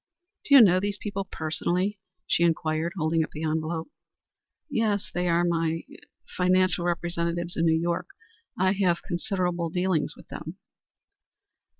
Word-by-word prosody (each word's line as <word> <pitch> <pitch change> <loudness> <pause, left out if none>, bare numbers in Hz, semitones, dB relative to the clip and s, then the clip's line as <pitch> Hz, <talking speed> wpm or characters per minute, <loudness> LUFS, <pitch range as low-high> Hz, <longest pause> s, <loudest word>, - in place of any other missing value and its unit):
"Do 280 - +5
you 270 - +11
know 185 -3 +5
these 200 +1 -2
people 200 -2 -4
personally?" 180 +4 -2 0.3
she - - +1
inquired, 165 0 +1
holding 160 0 +1
up - - -6
the 155 - -5
envelope. 160 +1 -2 0.8
"Yes. 220 -7 0
They 180 0 0
are 170 0 +3
my 165 -1 0
er - - -12 0.4
financial 185 -1 +2
representatives 170 0 -1
in 165 - +1
New 160 0 +3
York. 170 +1 -1 0.5
I 185 +1 +3
have 185 -3 +1
considerable 175 -1 -1
dealings 180 -2 0
with - - -16
them." - - -7
175 Hz, 140 wpm, -26 LUFS, 165-185 Hz, 0.8 s, you